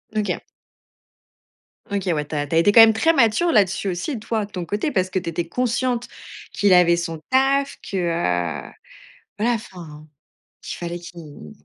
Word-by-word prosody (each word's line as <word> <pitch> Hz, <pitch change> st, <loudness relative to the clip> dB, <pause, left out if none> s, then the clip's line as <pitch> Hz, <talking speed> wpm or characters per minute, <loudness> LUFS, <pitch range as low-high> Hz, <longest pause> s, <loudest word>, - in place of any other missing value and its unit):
OK. 205 Hz, -4 st, -1 dB, 1.5 s
OK, 200 Hz, -1 st, -3 dB
ouais, 150 Hz, -2 st, -1 dB
tu 150 Hz, -, -6 dB
as 145 Hz, -, -1 dB
tu 160 Hz, -, -2 dB
as -, -, +4 dB
été 205 Hz, +5 st, +4 dB
quand 230 Hz, -, +9 dB
même 225 Hz, 0 st, +8 dB
très 325 Hz, +9 st, +2 dB
mature 270 Hz, +5 st, +3 dB
là-dessus 195 Hz, -2 st, +2 dB
aussi 205 Hz, -, -3 dB
toi, 220 Hz, 0 st, -2 dB
de 205 Hz, -, -19 dB
ton 180 Hz, -3 st, -5 dB
côté 210 Hz, -, -2 dB
parce 185 Hz, -6 st, 0 dB
que 185 Hz, -, -1 dB
tu 170 Hz, -, -5 dB
étais 170 Hz, 0 st, -3 dB
consciente 245 Hz, +3 st, -1 dB, 0.4 s
qu'il 200 Hz, -2 st, +3 dB
avait 170 Hz, -1 st, +5 dB
son 165 Hz, -2 st, -4 dB
taf, 275 Hz, +2 st, +2 dB
que, -, -, -7 dB
heu, 90 Hz, -, -1 dB, 0.7 s
voilà, 230 Hz, +3 st, +1 dB
enfin, 165 Hz, -8 st, -9 dB, 0.6 s
qu'il -, -, -7 dB
fallait 175 Hz, 0 st, -5 dB
qu'il 160 Hz, -, -12 dB
185 Hz, 175 wpm, -22 LUFS, 170-225 Hz, 1.5 s, quand